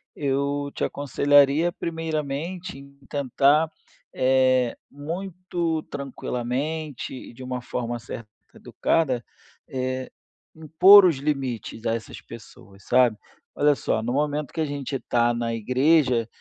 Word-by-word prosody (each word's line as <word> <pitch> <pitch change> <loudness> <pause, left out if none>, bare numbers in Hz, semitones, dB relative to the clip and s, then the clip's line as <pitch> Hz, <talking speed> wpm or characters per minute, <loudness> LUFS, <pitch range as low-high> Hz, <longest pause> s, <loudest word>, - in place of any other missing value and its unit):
Eu 140 0 -1
te - - -4
aconselharia 145 +3 +3
primeiramente 165 +1 -4
em 140 0 -16
tentar, 140 +3 +2 0.4
eh, 130 -1 +2
muito 170 +1 -4
tranquilamente 140 +2 -4
e 125 - -9
de 130 +2 -11
uma 125 -1 -4
forma 120 -1 -4
certa 115 -1 -8 0.3
educada, 130 -8 0 0.4
eh, 130 0 -3 0.5
impor 180 +6 +7
os 165 -6 +3
limites 135 -6 -3
a 115 - +1
essas 115 - -8
pessoas, 100 -3 -14
sabe? 125 -4 +3 0.4
"Olha 145 0 +3
só, 110 - -1
no 120 +2 -2
momento 145 0 -1
que 160 - -2
a - - +1
gente 140 -1 -4
está 120 -1 +1
na 115 -1 -2
igreja, 130 +1 +2
140 Hz, 120 wpm, -24 LUFS, 125-155 Hz, 0.5 s, impor